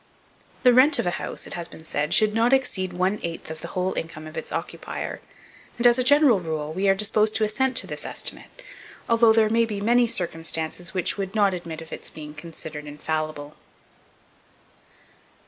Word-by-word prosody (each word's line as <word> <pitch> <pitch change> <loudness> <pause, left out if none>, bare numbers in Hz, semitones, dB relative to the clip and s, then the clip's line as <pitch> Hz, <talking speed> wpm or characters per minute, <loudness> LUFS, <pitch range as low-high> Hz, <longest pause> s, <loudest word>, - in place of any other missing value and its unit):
The 250 -1 +7
rent 260 +5 +6
of - - 0
a 175 - +1
house, - - -5
it - - -7
has 170 -1 -4
been 160 - -13
said, 150 -1 -1
should 215 -1 +4
not 230 +3 +3
exceed 200 -9 0
one 185 +4 0
eighth 165 -1 -5
of 160 - -8
the - - -6
whole 185 0 -2
income 155 -1 -6
of 155 - -10
its - - -5
occupier; - - -5 0.6
and, 240 - 0
as 240 +1 +6
a - - +2
general 285 -5 +5
rule, 155 -3 -4
we 195 +3 +1
are 195 - +5
disposed 215 +1 +2
to 220 - +2
assent 260 +5 0
to - - +3
this - - -5
estimate, - - -5 0.4
although 230 -1 +5
there 220 -1 +4
may 230 +1 +3
be 210 -2 -4
many 240 +3 +3
circumstances 170 -2 -1
which 185 - -1
would 195 +1 -4
not 200 -3 +3
admit 165 -3 -6
of 160 - -10
its - - -5
being 150 -1 -9
considered 155 -1 -8
infallible. 150 0 -4
185 Hz, 190 wpm, -24 LUFS, 160-225 Hz, 0.6 s, The